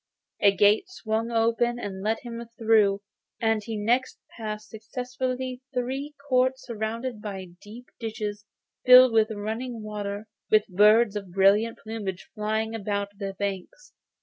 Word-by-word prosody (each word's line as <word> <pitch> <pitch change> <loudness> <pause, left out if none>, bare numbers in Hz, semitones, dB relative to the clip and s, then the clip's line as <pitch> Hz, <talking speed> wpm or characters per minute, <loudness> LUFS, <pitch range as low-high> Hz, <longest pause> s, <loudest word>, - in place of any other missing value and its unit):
The 200 -2 +6
gate 205 - +3
swung 225 -9 -2
open 230 +1 +1
to 240 - -4
let 200 +4 -2
him 235 -1 -6
through, 215 -3 +3 0.4
and 225 -1 +1
he 225 0 -4
next 240 +5 +1 0.2
passed 215 -1 -6
successively 250 +3 -4
three 270 +4 -3
courts, 260 0 +2
surrounded 230 +1 -4
by 195 -3 -6
deep 230 +4 -11
ditches 215 -3 -4 0.4
filled 255 0 +9
with 220 -1 +4
running 220 +2 -4
water, 205 0 -5 0.2
with 215 -1 +4
birds 210 +3 +5
of 200 -3 -5
brilliant 200 +5 +3
plumage 210 -4 -6
flying 220 +1 -1
about 200 -2 -2
the 195 -1 -4
banks. 200 - -5
220 Hz, 135 wpm, -26 LUFS, 205-240 Hz, 0.4 s, filled